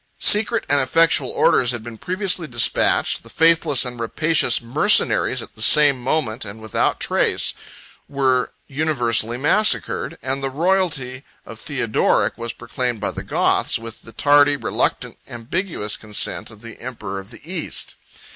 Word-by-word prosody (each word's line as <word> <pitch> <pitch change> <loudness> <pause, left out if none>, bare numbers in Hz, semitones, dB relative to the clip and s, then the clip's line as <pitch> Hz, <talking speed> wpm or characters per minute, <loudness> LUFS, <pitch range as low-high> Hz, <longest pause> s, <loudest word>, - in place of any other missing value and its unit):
Secret 220 +2 +4
and 145 +1 +2
effectual 150 0 +3
orders 125 - +2
had 120 -2 -2
been 115 -2 -10
previously 185 -2 -2
despatched; 120 -3 +1
the 115 - -14
faithless 160 -3 +2
and 125 -1 -7
rapacious 155 +2 +1
mercenaries, 130 - +2
at - - -14
the 110 - -12
same 140 +2 +5
moment, 120 -4 -1
and 105 +1 -8
without 110 -1 -1
resistance, - - +1 0.6
were 130 -3 0
universally 120 -6 -1
massacred; 150 - +1
and 135 +2 -2
the 135 - -2
royalty 150 -5 -1 0.2
of - - -11
Theodoric - - 0
was 115 0 -5
proclaimed 125 0 -4
by 100 - -2
the - - -7
Goths, - - +1
with 115 0 -9
the 115 - -14
tardy, 145 +4 +4
reluctant, - - -2
ambiguous 120 - -3
consent 105 -1 -2
of 110 -2 -15
the 115 -1 -12
emperor 115 -6 -6
of 95 +1 -12
the 115 - -13
East. 180 -2 -4
130 Hz, 145 wpm, -20 LUFS, 115-155 Hz, 0.6 s, same